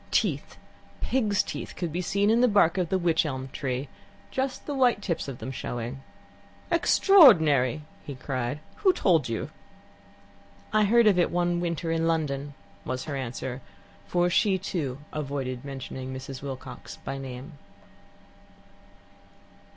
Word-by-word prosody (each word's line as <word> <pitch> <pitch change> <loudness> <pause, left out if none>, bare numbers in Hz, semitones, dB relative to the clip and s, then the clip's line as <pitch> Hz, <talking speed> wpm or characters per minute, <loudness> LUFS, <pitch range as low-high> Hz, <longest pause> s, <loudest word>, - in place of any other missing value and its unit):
Teeth, - - 0 0.4
pigs' 215 -6 +1
teeth, - - -6
could 175 -3 -3
be 175 +3 -2
seen 200 +4 +2
in 230 +2 +4
the 250 - +6
bark 200 -5 +4
of 175 -3 0
the 190 - +2
wych 170 -3 +2
elm 130 -3 -4
tree 130 0 -3 0.4
just 265 0 -2
the 290 - -3
white 255 -5 +3
tips 175 -7 -2
of 135 -3 -6
them 115 +4 -6
showing. 120 +1 -5 0.7
"Extraordinary!" 160 - +6 0.2
he 140 - -7
cried. 130 +1 -3 0.2
"Who 380 -3 +4
told 165 - +2
you?" 115 - -3 1.2
"I 215 -1 +4
heard 235 +3 +5
of 200 -4 +5
it 175 - +3
one 175 0 +1
winter 170 -1 -2
in 165 0 +1
London," 145 -3 -1 0.3
was 130 0 -3
her 145 - -4
answer, 130 0 -4 0.5
for 175 0 +2
she, 190 +2 +3
too, 160 -8 -3 0.2
avoided 135 -4 -3
mentioning 130 -1 -6
Mrs. 130 0 -7
Wilcox 130 -2 -8
by 135 0 -4
name. 135 +3 -8
155 Hz, 145 wpm, -27 LUFS, 130-190 Hz, 1.2 s, the